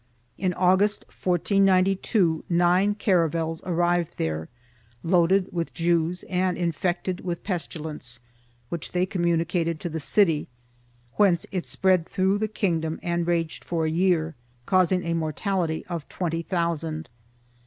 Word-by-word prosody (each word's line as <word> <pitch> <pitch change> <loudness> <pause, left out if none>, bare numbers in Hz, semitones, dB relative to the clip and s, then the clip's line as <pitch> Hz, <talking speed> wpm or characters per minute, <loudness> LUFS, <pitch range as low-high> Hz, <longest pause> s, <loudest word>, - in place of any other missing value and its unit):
In 185 -2 0
August, 190 +3 +2
1492, 185 -1 +2
nine 180 +4 +3
caravels 165 -5 +1
arrived 175 -1 +1
there, 80 0 -2 0.5
loaded 180 +2 +3
with 170 -2 -3
Jews 170 0 +1
and 185 0 0
infected 175 +2 -1
with 175 -2 -4
pestilence, 155 - -5 0.5
which 170 -2 -5
they 180 0 +2
communicated 170 -3 0
to 175 - -3
the 160 0 -4
city, 165 -1 +2 0.7
whence 190 -5 +3
it 185 -3 -3
spread 185 -3 +2
through 190 +2 +1
the 215 - 0
kingdom 165 -7 -1
and 170 -1 -1
raged 165 -2 -1
for 165 -2 -1
a 155 - 0
year, 165 -2 +1 0.3
causing 185 +1 +3
a 170 - 0
mortality 165 +1 -1
of 170 -4 -6
twenty 165 -2 -2
thousand. 165 -2 -2
175 Hz, 125 wpm, -25 LUFS, 165-185 Hz, 0.7 s, nine